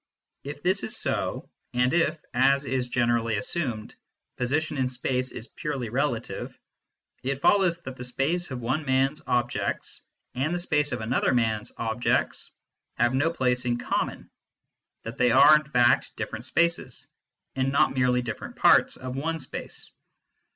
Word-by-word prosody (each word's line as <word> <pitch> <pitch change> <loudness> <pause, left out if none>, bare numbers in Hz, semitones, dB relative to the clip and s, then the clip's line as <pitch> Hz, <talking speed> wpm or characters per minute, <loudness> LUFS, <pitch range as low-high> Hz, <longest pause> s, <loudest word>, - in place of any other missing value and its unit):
If 145 +1 -8
this 185 +3 +2
is - - -2
so, - - -2 0.3
and 125 +1 +2
if, 165 -2 +2
as 135 +3 +3
is 130 -2 -1
generally 120 -2 +1
assumed, 115 -1 -2 0.4
position 145 +4 -1
in 130 -1 +1
space 130 0 -1
is 115 - -8
purely 140 -7 -4
relative, 125 -1 -2 0.6
it 135 +1 -2
follows 175 0 +3
that 130 -3 -7
the 125 - -6
space 145 +8 0
of 130 -2 -5
one 130 +7 -1
man 135 0 +2
s 150 - -15
objects 120 -1 -1 0.3
and 145 +7 -1
the - - 0
space 150 -4 +1
of 120 -2 -3
another 120 +3 +1
man 110 -3 +1
s - - -10
objects 115 +1 0 0.5
have 120 +1 +2
no 145 +5 +2
place 125 -6 0
in 120 -1 +1
common, - - -3 0.7
that 115 - -7
they 125 - +4
are 140 +5 +8
in 150 -1 +1
fact 120 -4 +2
different 110 +2 -5
spaces, 170 +5 0 0.5
and 135 0 0
not 140 - +3
merely 125 -1 +2
different 115 -2 -6
parts - - +4
of 130 0 -6
one 165 +4 -2
space. 160 - -5
130 Hz, 160 wpm, -26 LUFS, 120-150 Hz, 0.7 s, are